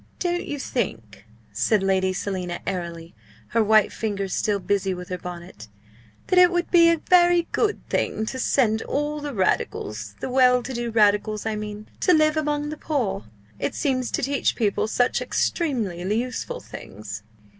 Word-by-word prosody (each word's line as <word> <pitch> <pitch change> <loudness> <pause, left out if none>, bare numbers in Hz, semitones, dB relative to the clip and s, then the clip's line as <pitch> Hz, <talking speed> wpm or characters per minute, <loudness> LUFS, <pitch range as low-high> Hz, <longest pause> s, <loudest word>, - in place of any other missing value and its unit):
"Don't 350 -1 -1
you 290 - -3
think," 110 - -4 0.3
said 190 - +2
Lady 190 -1 +2
Selina, 185 -2 -3
airily, 170 -2 -5 0.4
her 230 -1 +2
white 215 0 +4
fingers 200 -4 -3
still 210 -1 +1
busy 195 -1 0
with 180 0 -8
her 180 - -3
bonnet, 175 - -9 0.6
"that 365 - +3
it 360 -1 +8
would 350 0 -1
be 335 -1 +7
a 335 - +3
very 350 +1 +4
good 430 -1 0
thing 220 - -1
to 260 +4 -5
send 225 -4 +2
all 295 +1 -2
the 290 -3 -5
Radicals 105 - -1
the - - -4
well 250 -1 +4
to 265 - -5
do 240 -1 -2
Radicals 210 -1 +2
I 220 -1 -1
mean 210 0 -6
to 360 - +4
live 310 0 +3
among 295 -1 -1
the 305 - -5
poor? 255 - -2 0.3
It - - -2
seems 255 -4 0
to - - -1
teach 275 +2 +1
people 215 -2 0
such 245 +3 +1
extremely 230 - -1 0.2
useful 250 +1 -4
things!" 105 +2 -9
220 Hz, 165 wpm, -24 LUFS, 190-290 Hz, 0.6 s, it